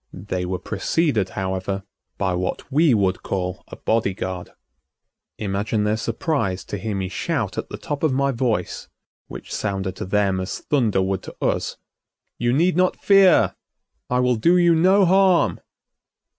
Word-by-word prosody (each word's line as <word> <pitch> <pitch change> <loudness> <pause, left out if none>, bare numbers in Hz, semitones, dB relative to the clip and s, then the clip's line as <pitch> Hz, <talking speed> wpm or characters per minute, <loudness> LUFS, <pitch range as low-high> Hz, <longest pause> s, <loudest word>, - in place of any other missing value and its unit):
They 90 -1 -4
were 90 0 -2
preceded, 110 - 0
however, 95 0 -2 0.3
by 95 -2 0
what 90 +9 -3
we 155 +2 +4
would 95 -3 +1
call 90 -1 -3
a - - -9
body 110 -4 0
guard. 95 -2 -5 0.9
Imagine 105 +1 -1
their 105 +1 +1
surprise 110 - -2
to 105 - -5
hear 105 +1 -3
me 95 -1 -2
shout 95 - -2
at - - -4
the - - -6
top 145 -1 -5
of 155 - +2
my 140 +1 +1
voice, 115 -7 -2 0.4
which - - -9
sounded 95 -2 -2
to - - -4
them 95 -1 +1
as 95 - -4
thunder 115 -9 +1
would 95 0 -1
to - - -10
us: - - -1 0.6
"You 120 0 +1
need 170 +7 +2
not 180 +1 +2
fear, 195 -3 +5 0.6
I 125 0 +2
will 125 -1 +2
do 170 +11 +4
you 175 -1 +5
no 185 +4 +4
harm!" 190 -1 +3
105 Hz, 160 wpm, -22 LUFS, 95-145 Hz, 0.9 s, fear